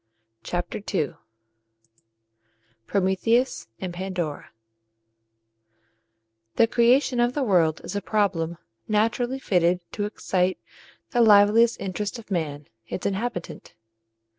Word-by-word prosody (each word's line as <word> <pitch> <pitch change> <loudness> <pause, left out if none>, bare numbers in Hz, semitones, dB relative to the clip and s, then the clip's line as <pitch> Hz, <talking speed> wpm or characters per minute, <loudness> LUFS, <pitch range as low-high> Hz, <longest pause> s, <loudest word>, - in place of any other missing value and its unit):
CHAPTER 175 +3 -4
II 150 -6 0 1.7
PROMETHEUS 205 +6 +1
AND 180 -2 -5
PANDORA 175 -4 -4 2.1
The 230 - +5
creation 245 +3 +3
of 240 +1 +2
the 290 - -1
world 170 -8 +2
is - - -6
a 200 - -1
problem 180 -7 0 0.3
naturally 230 +4 +1
fitted 180 -8 +2
to 205 - -2
excite 185 -3 -1 0.5
the 245 - +2
liveliest 220 +2 +5
interest 200 +4 -4
of 225 -2 -13
man, 150 -5 -2 0.2
its 180 - -5
inhabitant. 195 -2 -4
200 Hz, 100 wpm, -25 LUFS, 180-230 Hz, 2.1 s, The